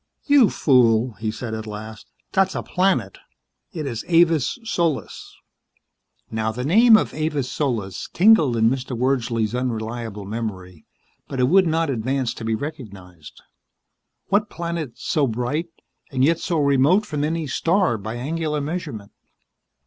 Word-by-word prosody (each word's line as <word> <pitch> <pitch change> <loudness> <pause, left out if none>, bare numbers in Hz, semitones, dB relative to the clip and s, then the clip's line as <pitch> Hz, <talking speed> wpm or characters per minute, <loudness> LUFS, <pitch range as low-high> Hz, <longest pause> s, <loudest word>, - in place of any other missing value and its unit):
"You 285 -7 +5
fool," 120 -3 +3
he 110 0 -2
said 110 +1 -5
at 110 0 -5
last, 110 +1 -8 0.2
"that's 190 0 +1
a - - -3
planet. 190 +1 0 0.5
It 155 -4 -5
is 120 -5 -4
Avis 165 -5 +3
Solis." 170 -8 -3 0.9
Now 110 0 -1
the 125 +3 -5
name 220 - +7
of - - -2
Avis 150 -4 -2
Solis 115 -10 -3
tingled 165 - +4
in 110 0 +4
Mr. 130 0 -2
Wordsley's 120 -3 0
unreliable 115 -4 -4
memory, 95 -6 -6 0.4
but 135 - -5
it 125 0 +3
would 190 +1 +5
not 160 -2 0
advance 130 +1 -1
to - - -9
be 110 0 0
recognized. 100 - -9 0.9
What 205 +2 +2
planet 170 -6 -4
so 145 -3 0
bright, 125 +8 -2 0.4
and 130 -1 0
yet 165 +2 +2
so 170 -4 -1
remote 145 +8 +3
from 150 -7 -3
any 160 +1 -1
star 170 - +1
by 110 +3 -6
angular 150 +4 -2
measurement? 145 - -5
135 Hz, 140 wpm, -22 LUFS, 115-165 Hz, 0.9 s, name